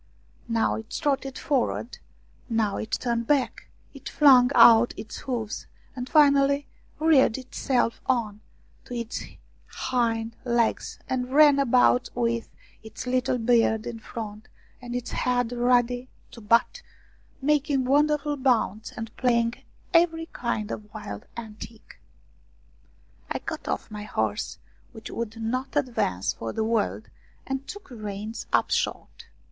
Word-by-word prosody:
Now 230 -1 +1
it 220 0 -9
trotted 270 -2 -1
forward, 255 -3 -1 0.5
now 220 -3 0
it 220 - -5
turned 235 -1 -1
back, 275 -5 0 0.2
it 275 -1 -8
flung 260 -4 +6
out 235 0 +7
its 215 +1 -7
hooves, 230 -5 -4 0.3
and 250 -1 -5
finally 280 -1 +4 0.3
reared 300 -7 +4
itself 255 -2 -1
on 220 -5 0 0.4
to 245 - -7
its 235 -1 -4 0.5
hind 230 -3 -1
legs 235 -2 0
and 250 -1 -2
ran 290 0 +6
about 250 -1 +3
with 235 -1 -1 0.3
its 220 +3 -8
little 255 0 +1
beard 225 -2 +2
in 230 -1 -5
front, 220 -1 -7 0.3
and 245 -1 -6
its 245 -1 -4
head 245 -1 0
ready 245 +1 +1 0.2
to 235 - -12
butt, 230 - +2 0.6
making 285 -2 +1
wonderful 295 +2 +2
bounds 235 -5 +1
and 225 0 -6
playing 235 -2 +2 0.4
every 330 -1 +3
kind 220 -3 -2
of 210 0 -7
wild 105 - -7
antic. 220 - -10 1.3
I - - -1
got - - -6
oflF - - -3
my 210 0 -6
horse, 110 - -2 0.4
which 220 -1 -9
would 225 -1 -5
not 255 +5 -3
advance 100 - 0
for 115 - -5
the 220 - -1
world, 220 -1 -1 0.4
and 270 0 -4
took 410 -4 -9
the 245 - -10
reins 210 +1 -6
up - - +2
short. - - -2
240 Hz, 130 wpm, -26 LUFS, 225-265 Hz, 1.3 s, out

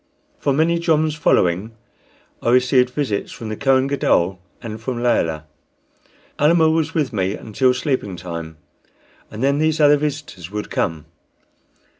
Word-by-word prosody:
For 140 - 0
many 160 +4 +2
joms 160 -2 +1
following 100 - +1 0.7
I - - 0
received 125 +1 +4
visits 125 -6 -2
from 115 - -7
the 110 - -3
Kohen 135 +1 +2
Gadol 95 -10 +1 0.2
and 110 -1 -7
from 120 0 -4
Layelah. 80 -10 +1 1.0
Almah 160 +1 +4
was 160 0 -1
with 150 -7 0
me 95 -1 -1
until 125 +4 +1
sleeping 125 - -2
time, 85 -2 -7 0.7
and 110 - -6
then 140 +1 +2
these 155 0 +1
other 145 -1 +6
visitors 145 - -5
would 105 +1 -5
come. 80 -4 -2
125 Hz, 140 wpm, -20 LUFS, 100-150 Hz, 1.0 s, other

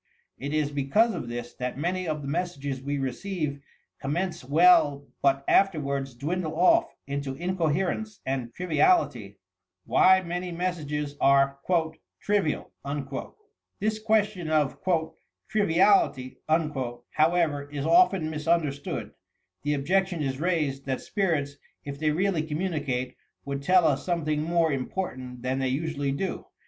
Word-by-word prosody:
It 140 - -4
is 150 -1 0
because 145 - +2
of - - -5
this 120 0 -5
that 125 0 -4
many 180 +4 -1
of 155 -2 -2
the - - -5
messages 145 -4 -3
we 140 +1 -2
receive 140 +2 -3 0.4
commence 160 +5 -2
well 145 -1 +4 0.2
but 135 0 +2
afterwards 140 -8 +1
dwindle 155 +5 -3
off 335 - +4
into 140 -1 -3
incoherence 180 +5 -1
and 130 -3 -2
triviality. 145 - +1 0.5
WHY 190 0 +5
MANY 175 +1 -4
MESSAGES 150 -5 -3
AHE 140 0 +4 0.7
"TEIVIAL" 200 -7 0 1.1
This 215 +1 0
question 210 -6 +1
of 150 -3 +1 0.7
"triviality," 190 -9 +2
however, 150 +1 0
is 145 -1 -4
often 170 -2 +4
mis 155 0 -6
understood. 155 -4 0 0.5
The 150 +1 0
objection 180 +3 0
is 135 0 -3
raised, 150 -6 -1
that 130 -1 -1
spirits, 150 -8 -1 0.3
if 140 0 -6
they 155 -1 +1
really 175 +2 +1
communicate, 150 -6 -2 0.3
would 140 0 -3
tell 180 +4 +4
us 140 -3 +2
something 155 -4 0
more 165 0 +2
im 135 -2 -2
portant 130 -9 -5
than 130 +1 -1
they 135 - 0
usually 145 +1 -1
do. 185 +8 -3
150 Hz, 130 wpm, -27 LUFS, 140-180 Hz, 1.1 s, WHY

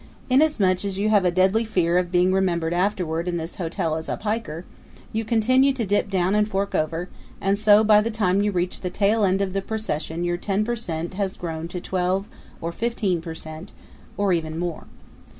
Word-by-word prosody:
Inasmuch 225 -11 +3
as 195 -1 -3
you 205 +2 +1
have 205 -3 +4
a - - +5
deadly 190 +5 +3
fear 180 -5 +2
of 175 -1 -3
being 180 +1 +3
remembered 170 -3 +1
afterward 180 -3 -1
in 175 -1 -1
this 165 +3 -6
hotel 165 -3 -2
as 160 0 -5
a - - -2
piker, 205 -6 -3 0.5
you 220 +1 0
continue 255 +5 +3
to 240 -4 -2
dip 205 +1 +1
down 185 -1 +1
and 210 0 +3
to - - -14
fork 200 +1 -1
over, 165 +3 -1 0.3
and 195 +1 +1
so 215 0 +6
by 210 -1 +6
the 225 - -1
time 200 -3 +1
you 205 0 +1
reach 180 -1 -2
the 180 - -2
tail 205 +4 +2
end 195 0 +2
of 190 -1 -3
the 195 - 0
procession 175 -6 -3
your 175 0 0
ten 200 +3 -1
per 240 +1 -1
cent 170 -7 -4
has 195 0 -2
grown 165 -1 -4
to 180 +1 -5
twelve 185 +2 -1 0.3
or 165 - -3
fifteen 205 -4 -1
per 165 -1 -7
cent, 160 +4 -9 0.4
or 200 -2 +2
even 160 -2 -2
more. 175 -2 -4
190 Hz, 210 wpm, -23 LUFS, 175-210 Hz, 0.5 s, so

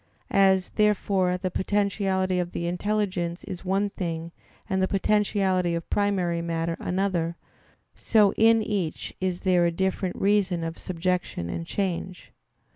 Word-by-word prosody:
As, 190 -1 +4
therefore, 195 -3 +2
the 185 0 -3
potentiality 190 -1 0
of 175 -1 -3
the 170 - -3
intelligence 180 -1 -1
is 180 - -7
one 195 +2 0
thing 165 -3 -4 0.4
and 190 -3 0
the 190 - +3
potentiality 195 -3 +1
of 170 - -4
primary 185 -5 +1
matter 165 0 -2
another, 180 -3 -1 0.6
so 210 -3 +3
in 225 0 +4
each 195 -7 -3
is 185 -1 -1
there 180 -3 +3
a - - +1
different 190 +1 -1
reason 195 -4 +1
of 165 0 -5
subjection 180 - -2
and 165 - -5
change. 185 -1 -3
185 Hz, 135 wpm, -26 LUFS, 175-200 Hz, 0.6 s, As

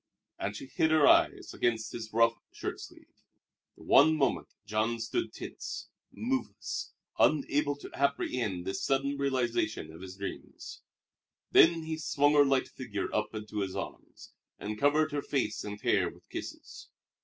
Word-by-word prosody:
And 100 +1 -2
she 105 - -7
hid 160 +4 +1
her 155 -2 +5
eyes - - +4
against 115 -2 0
his 110 -2 -6
rough 115 +1 +4 0.2
shirt - - -5
sleeve. - - -14 0.5
For - - -15
one 160 +3 +6
moment 135 -4 +1 0.2
Jean 110 +2 0
stood 345 - -2
tense, - - -7 0.2
moveless, 260 +3 -3 0.3
unable 145 -1 +3
to 145 - -11
apprehend 125 -9 -1
this 95 - -3
sudden 140 +1 +1
realization 120 - -1
of 80 - -12
his 95 -1 -8
dreams. 100 0 -7 0.7
Then 165 0 +6
he 160 0 -4
swung 145 -1 +2
her 145 -1 +7
light 135 -1 +2
figure 105 -6 -5
up 105 +1 -1
into 105 0 -5
his 95 -2 -2
arms, - - -8 0.2
and 105 0 -5
covered 150 +3 +3
her 145 0 -1
face 135 -7 -1
and 105 0 -6
hair - - +2
with - - -18
kisses. - - -8
130 Hz, 155 wpm, -30 LUFS, 105-145 Hz, 0.7 s, her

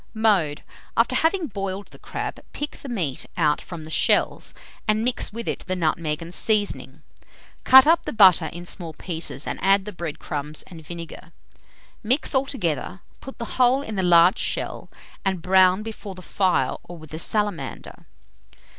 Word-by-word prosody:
Mode. 195 -10 +2 0.3
After - - +3
having 335 +2 +2
boiled 195 -5 -5
the - - -16
crab, - - -5
pick 295 +1 -4
the 275 - -9
meat 170 - -2
out 150 -3 +2
from 170 -4 -8
the 155 - -9
shells, - - +2 0.3
and 215 +1 +2
mix 245 -2 -1
with 230 +2 -6
it - - -2
the 185 - -1
nutmeg 160 -2 -1
and 170 +1 -9
seasoning. 210 0 0 0.6
Cut 265 0 +9
up 330 +2 +4
the - - -1
butter 185 -6 +6
in 175 +3 -8
small 170 -2 -5
pieces, 160 -3 -2
and - - -4
add 195 0 +4
the 210 - -6
bread 170 -3 -5
crumbs 150 +1 -4
and 170 -3 -12
vinegar. 170 +1 -9 0.7
Mix 250 +8 0
altogether, 195 - -1 0.2
put 270 - -10
the 235 +2 -4
whole 255 +3 +4
in 220 -5 -6
the 190 - 0
large 175 0 +5
shell, - - -3 0.3
and 190 -4 -1
brown 185 +1 +4
before 215 -3 -7
the 185 - -11
fire 190 -1 +1
or 175 - -8
with 155 -1 -13
a 160 - -4
salamander. 205 -1 -2
190 Hz, 170 wpm, -23 LUFS, 165-220 Hz, 0.7 s, Cut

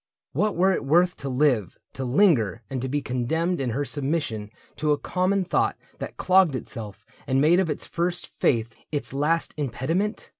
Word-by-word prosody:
What 210 -1 0
were 185 +3 +4
it - - -2
worth 175 +6 +3
To 140 - -5
live, 125 - +1 0.2
to 135 - -4
linger, 125 - +3
and 130 -2 -2
to 130 - -3
be 145 +1 -1
condemned 160 +8 -1
In 130 - -1
her 140 +5 -1
submission 140 -8 -2 0.3
to 150 -1 +1
a - - 0
common 185 +3 0
thought - - +1 0.2
That - - -6
clogged 185 -6 +4
itself 110 -6 -6 0.2
and 130 0 +2
made 160 +5 +5
of 185 -3 +1
its - - -3
first 175 +1 -1
faith 115 -2 +1 0.2
Its 145 -3 -3
last 155 +4 +1
impediment 150 - -2
145 Hz, 180 wpm, -25 LUFS, 125-175 Hz, 0.3 s, made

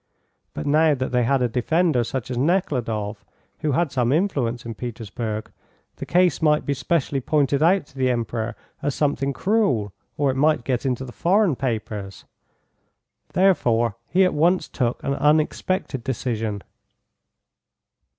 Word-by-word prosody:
But - - -4
now 155 +1 +4
that 130 -1 -3
they 125 0 +2
had 135 +1 +2
a - - +3
defender 130 +3 +1
such 125 +1 -4
as 125 - -3
Nekhludoff, 120 - -1 0.4
who 150 -3 0
had 155 +2 +1
some 125 -2 +1
influence 135 - 0
in 115 - -5
Petersburg, 110 -1 -5 0.5
the - - -6
case 180 0 +3
might 150 -1 +3
be 140 - 0
specially 140 -1 -1
pointed 140 0 +1
out 180 +1 +4
to 140 - -24
the 130 -1 +2
Emperor 115 -1 -2 0.3
as 145 - -1
something 140 -2 0
cruel, 135 - +1 0.2
or 140 -2 +2
it 130 - -4
might 150 -2 +3
get 125 +1 -1
into 130 0 -2
the 125 - -9
foreign 185 - +2
papers. 105 -6 -4 1.1
Therefore 120 - +2
he 190 +2 +3
at 180 - +1
once 175 +5 +2
took 120 -2 -2
an 140 - 0
unexpected 150 - 0
decision. 115 -5 -3
135 Hz, 150 wpm, -23 LUFS, 120-155 Hz, 1.1 s, now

